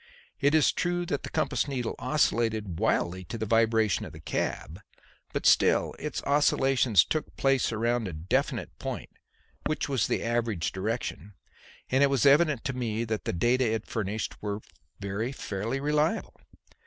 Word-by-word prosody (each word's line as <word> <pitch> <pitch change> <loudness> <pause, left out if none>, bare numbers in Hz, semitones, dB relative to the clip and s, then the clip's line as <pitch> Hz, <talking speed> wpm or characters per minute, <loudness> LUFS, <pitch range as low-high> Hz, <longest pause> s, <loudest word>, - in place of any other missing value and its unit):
It 145 +2 +3
is 155 - +5
true 175 0 -1
that 145 -4 -2
the - - -6
compass 155 -1 0
needle 125 -4 -2
oscillated 110 - 0
wildly 90 +2 0
to 115 - -6
the 110 - -2
vibration 115 -2 +2
of - - -8
the - - -10
cab, 80 +5 -3 0.5
but - - -3
still - - +4
its 150 - -4
oscillations 135 - +3
took 155 - -3
place 135 -3 +2
around 115 0 0
a 90 - -5
definite 80 +4 -2
point - - -5 0.6
which 155 - -1
was 135 -5 +1
the - - -1
average 115 -6 -1
direction, 100 - -4 0.6
and 130 +2 +3
it 140 - +5
was 135 -4 +2
evident 145 -2 +4
to 135 - -2
me 115 -3 -2
that 110 -1 -3
the - - 0
data 120 +6 +2
it 110 -1 -2
furnished 105 0 -3
were 105 0 -3 0.4
very 100 +5 -3
fairly 115 0 -3
reliable. 150 +7 0
115 Hz, 160 wpm, -28 LUFS, 105-140 Hz, 0.6 s, is